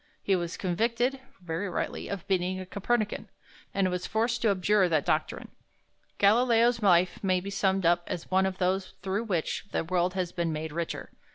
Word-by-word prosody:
He 195 Hz, -, +3 dB
was 175 Hz, -1 st, -3 dB
convicted 235 Hz, +8 st, 0 dB, 0.2 s
(very 175 Hz, +3 st, -3 dB
rightly) -, -, -3 dB
of 195 Hz, -3 st, -5 dB
being 185 Hz, -1 st, 0 dB
a 185 Hz, -, -6 dB
Copernican, 210 Hz, +3 st, -1 dB, 0.4 s
and 190 Hz, -2 st, +1 dB
was 180 Hz, 0 st, -3 dB
forced 230 Hz, +2 st, 0 dB
to 225 Hz, -, +3 dB
abjure 195 Hz, 0 st, +3 dB
that 155 Hz, -3 st, +1 dB
doctrine. -, -, -1 dB, 0.7 s
Galileo's 230 Hz, +2 st, +4 dB
life 180 Hz, -2 st, +3 dB
may 185 Hz, -1 st, +2 dB
be 195 Hz, +2 st, -6 dB
summed 195 Hz, -1 st, +1 dB
up 175 Hz, +1 st, +4 dB
as 170 Hz, -, -5 dB
one 190 Hz, +1 st, +3 dB
of 190 Hz, -1 st, -4 dB
those 185 Hz, +1 st, -1 dB
through 195 Hz, +4 st, -1 dB
which 180 Hz, -5 st, -2 dB
the -, -, 0 dB
world 180 Hz, +2 st, 0 dB
has 180 Hz, -2 st, -1 dB
been 170 Hz, -2 st, -1 dB
made 155 Hz, 0 st, -4 dB
richer. 170 Hz, +1 st, -4 dB
190 Hz, 180 wpm, -28 LUFS, 175-205 Hz, 0.7 s, Galileo's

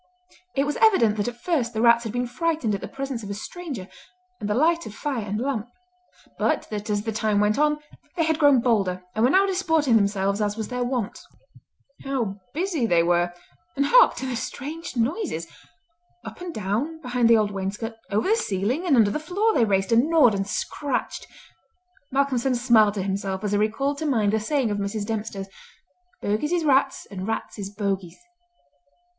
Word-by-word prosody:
It 275 Hz, -, +2 dB
was 295 Hz, -, -2 dB
evident 240 Hz, -, +4 dB
that 205 Hz, -, -1 dB
at 240 Hz, 0 st, -5 dB
first 250 Hz, -6 st, -1 dB
the -, -, -1 dB
rats 235 Hz, 0 st, +5 dB
had 220 Hz, -, -3 dB
been 245 Hz, +2 st, -1 dB
frightened 305 Hz, -2 st, -1 dB
at 200 Hz, -, -3 dB
the -, -, -5 dB
presence 270 Hz, -3 st, -5 dB
of 205 Hz, -, -8 dB
a 200 Hz, -, -3 dB
stranger, 270 Hz, -, -7 dB, 0.5 s
and 205 Hz, -, -4 dB
the 210 Hz, -, +1 dB
light 335 Hz, +5 st, +2 dB
of 210 Hz, -, -9 dB
fire 270 Hz, -5 st, -3 dB
and 205 Hz, +1 st, -3 dB
lamp; 245 Hz, -3 st, -2 dB, 0.7 s
but -, -, +1 dB
that 210 Hz, 0 st, -4 dB
as 205 Hz, 0 st, 0 dB
the 225 Hz, -, -2 dB
time 215 Hz, -1 st, +1 dB
went 210 Hz, +4 st, +2 dB
on 300 Hz, 0 st, +3 dB, 0.4 s
they 330 Hz, -, +3 dB
had 320 Hz, -1 st, +1 dB
grown 285 Hz, -5 st, +5 dB
bolder 195 Hz, -7 st, +1 dB
and 220 Hz, -, 0 dB
were 250 Hz, -, +5 dB
now 380 Hz, +6 st, +5 dB
disporting 325 Hz, -10 st, +2 dB
themselves 200 Hz, 0 st, 0 dB
as 205 Hz, 0 st, -1 dB
was 220 Hz, -, -4 dB
their 250 Hz, 0 st, -2 dB
wont. 245 Hz, -4 st, -2 dB, 0.8 s
How 235 Hz, -8 st, -2 dB
busy 325 Hz, -6 st, -1 dB
they 170 Hz, -4 st, +4 dB
were! 175 Hz, 0 st, +2 dB, 0.4 s
and 280 Hz, -, +1 dB
hark -, -, +6 dB
to -, -, -5 dB
the 260 Hz, -2 st, -2 dB
strange 285 Hz, +5 st, -6 dB
noises! 235 Hz, -, -1 dB, 0.8 s
Up -, -, -9 dB
and 355 Hz, -1 st, -5 dB
down 235 Hz, -, -2 dB
behind 250 Hz, -4 st, +1 dB
the 230 Hz, -, +7 dB
old 210 Hz, -1 st, +1 dB
wainscot, 200 Hz, +4 st, -4 dB, 0.2 s
over 210 Hz, -, 0 dB
the 435 Hz, -, +4 dB
ceiling 245 Hz, -, -1 dB
and 295 Hz, -, +4 dB
under 215 Hz, -4 st, +4 dB
the 300 Hz, -, -2 dB
floor 395 Hz, +8 st, 0 dB
they 240 Hz, -, +3 dB
raced, 195 Hz, -1 st, 0 dB
and 235 Hz, +7 st, +4 dB
gnawed, 305 Hz, -9 st, +5 dB
and 195 Hz, 0 st, -2 dB
scratched! 285 Hz, +6 st, -3 dB, 0.8 s
Malcolmson 270 Hz, -2 st, +1 dB
smiled 230 Hz, -4 st, +4 dB
to 195 Hz, -, -2 dB
himself 195 Hz, 0 st, -3 dB
as 205 Hz, -, -1 dB
he 205 Hz, -, +2 dB
recalled 270 Hz, +7 st, 0 dB
to 315 Hz, -, -2 dB
mind 215 Hz, -7 st, +2 dB
the 220 Hz, -, +2 dB
saying 250 Hz, 0 st, 0 dB
of 205 Hz, -, -2 dB
Mrs. 205 Hz, +1 st, -3 dB
Dempster, 210 Hz, -2 st, -4 dB, 0.8 s
"Bogies 215 Hz, +10 st, 0 dB
is 340 Hz, -2 st, +1 dB
rats, 270 Hz, -1 st, +2 dB
and 190 Hz, 0 st, -5 dB
rats 225 Hz, -1 st, -4 dB
is 195 Hz, -1 st, -4 dB
bogies!" 195 Hz, -4 st, -3 dB
230 Hz, 195 wpm, -24 LUFS, 205-285 Hz, 0.8 s, the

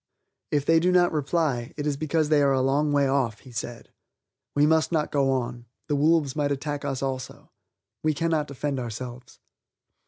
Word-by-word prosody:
"If 145 Hz, -1 st, 0 dB
they 165 Hz, +1 st, +5 dB
do 180 Hz, +2 st, +2 dB
not 175 Hz, -1 st, +4 dB
reply, 145 Hz, -4 st, -1 dB
it 145 Hz, -, -3 dB
is 150 Hz, -1 st, 0 dB
because 155 Hz, +1 st, 0 dB
they 150 Hz, -2 st, +4 dB
are 140 Hz, -1 st, +4 dB
a 130 Hz, -, +2 dB
long 140 Hz, +3 st, +2 dB
way 140 Hz, -1 st, +3 dB
off," 130 Hz, -5 st, 0 dB
he 130 Hz, -, -14 dB
said. 120 Hz, 0 st, -6 dB, 0.6 s
"We 145 Hz, 0 st, +4 dB
must 160 Hz, +1 st, +3 dB
not 155 Hz, -3 st, 0 dB
go 140 Hz, -2 st, +2 dB
on; 120 Hz, -2 st, -3 dB, 0.2 s
the 145 Hz, -, 0 dB
wolves 150 Hz, -1 st, +2 dB
might 145 Hz, -2 st, 0 dB
attack 145 Hz, +1 st, -3 dB
us 140 Hz, -1 st, -3 dB
also. 130 Hz, -1 st, -5 dB, 0.5 s
We 155 Hz, -1 st, +1 dB
cannot 160 Hz, -1 st, 0 dB
defend 140 Hz, 0 st, -3 dB
ourselves." 120 Hz, +1 st, -7 dB
145 Hz, 185 wpm, -26 LUFS, 130-155 Hz, 0.6 s, they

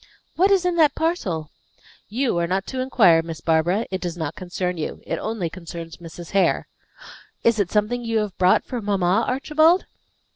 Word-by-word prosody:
What 375 Hz, +4 st, +4 dB
is 385 Hz, -3 st, +3 dB
in 355 Hz, -1 st, +1 dB
that 305 Hz, -4 st, +4 dB
parcel?" 185 Hz, -, -2 dB, 0.6 s
"You 245 Hz, +2 st, 0 dB
are 170 Hz, -, 0 dB
not 190 Hz, +2 st, -1 dB
to 260 Hz, -, -5 dB
inquire, 205 Hz, -11 st, +4 dB
Miss 165 Hz, -1 st, -7 dB
Barbara. 170 Hz, +7 st, +1 dB
It 190 Hz, -, -3 dB
does 175 Hz, -1 st, -4 dB
not 160 Hz, -2 st, -3 dB
concern 180 Hz, 0 st, -3 dB
you. 155 Hz, -, -5 dB
It -, -, -3 dB
only 220 Hz, -6 st, -2 dB
concerns 170 Hz, -1 st, -8 dB
Mrs. 170 Hz, 0 st, -10 dB
Hare." 195 Hz, -1 st, +2 dB, 0.8 s
"Is 230 Hz, -2 st, +3 dB
it 195 Hz, -3 st, +1 dB
something 220 Hz, +4 st, 0 dB
you 230 Hz, -1 st, -1 dB
have 210 Hz, -3 st, -2 dB
brought 185 Hz, 0 st, +4 dB
for 245 Hz, -2 st, -4 dB
mamma, 200 Hz, 0 st, +1 dB
Archibald?" 310 Hz, +7 st, +3 dB
195 Hz, 180 wpm, -23 LUFS, 175-250 Hz, 0.8 s, What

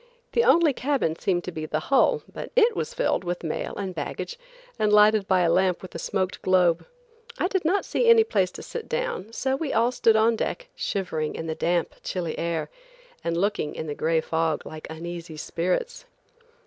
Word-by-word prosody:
The 470 Hz, -, +3 dB
only 335 Hz, -9 st, +5 dB
cabin 260 Hz, -, 0 dB
seemed 175 Hz, 0 st, 0 dB
to 180 Hz, -, -5 dB
be 155 Hz, -2 st, -5 dB
the 155 Hz, -, -1 dB
hull, 275 Hz, -, +3 dB
but -, -, -7 dB
it 475 Hz, -1 st, +5 dB
was 465 Hz, -, -2 dB
filled -, -, +1 dB
with 175 Hz, 0 st, -3 dB
mail 160 Hz, -, -3 dB
and 195 Hz, -2 st, -3 dB
baggage 475 Hz, -, -5 dB, 0.4 s
and 215 Hz, -1 st, +2 dB
lighted 210 Hz, -1 st, +5 dB
by 185 Hz, -1 st, +3 dB
a 170 Hz, -1 st, +3 dB
lamp 185 Hz, 0 st, +2 dB
with 185 Hz, -, -9 dB
a -, -, -5 dB
smoked 185 Hz, +2 st, -2 dB
globe. 180 Hz, -3 st, +3 dB, 0.5 s
I -, -, +1 dB
did 380 Hz, -2 st, -1 dB
not 365 Hz, +6 st, +1 dB
see 485 Hz, -, 0 dB
any 460 Hz, -1 st, +8 dB
place 195 Hz, -, +1 dB
to -, -, -8 dB
sit 475 Hz, -, -7 dB
down, 480 Hz, -, -2 dB
so 265 Hz, +3 st, -1 dB
we 285 Hz, 0 st, -3 dB
all 230 Hz, +2 st, +3 dB
stood 230 Hz, -3 st, +3 dB
on 225 Hz, +1 st, +4 dB
deck, -, -, -3 dB
shivering 160 Hz, -6 st, -2 dB
in 160 Hz, -, -5 dB
the 160 Hz, -, -2 dB
damp, 170 Hz, +1 st, 0 dB
chilly 170 Hz, -4 st, -3 dB
air, 165 Hz, -2 st, -2 dB, 0.5 s
and 170 Hz, 0 st, -1 dB
looking 200 Hz, -5 st, -1 dB
in -, -, -4 dB
the 150 Hz, -, -3 dB
gray 160 Hz, +2 st, +1 dB
fog 160 Hz, -1 st, -1 dB
like 155 Hz, 0 st, -8 dB
uneasy 170 Hz, 0 st, -7 dB
spirits. 180 Hz, -, -2 dB
185 Hz, 200 wpm, -25 LUFS, 165-275 Hz, 0.5 s, any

